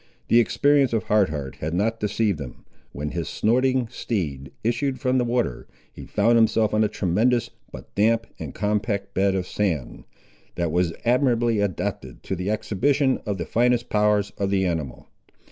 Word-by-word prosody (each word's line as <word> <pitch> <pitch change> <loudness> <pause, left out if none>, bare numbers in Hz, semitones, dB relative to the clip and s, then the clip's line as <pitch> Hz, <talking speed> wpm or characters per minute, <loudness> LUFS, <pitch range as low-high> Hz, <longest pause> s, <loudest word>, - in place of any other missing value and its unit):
The 115 - +6
experience 140 +2 +3
of 110 -4 +1
Hard 105 -3 +2
Heart 70 -3 -5
had 80 +3 -3
not 110 +4 0
deceived 105 -5 0
him. 65 -4 -9 0.3
When 75 0 -5
his 85 -2 -3
snorting 130 +2 +1
steed 75 - -3
issued 130 +4 0
from 130 -1 +1
the - - +2
water, 120 0 -1 0.3
he - - -10
found 115 +3 +3
himself 110 -1 +3
on 110 0 +3
a - - +3
tremendous 110 +5 +1 0.2
but - - -11
damp 110 +3 +2
and - - -6
compact 100 -1 -1
bed 95 0 +2
of 95 -1 -1
sand, 80 -13 -2 0.5
that 85 -2 -1
was 90 0 +1
admirably 120 -2 +2
adapted 85 -9 -3
to 95 - -3
the 90 +2 -3
exhibition 130 +6 +1
of 100 -2 -1
the 85 - -4
finest 120 0 +1
powers 105 -1 +2
of 100 -1 0
the 95 -1 +1
animal. 80 -8 -3
105 Hz, 170 wpm, -24 LUFS, 90-120 Hz, 0.5 s, The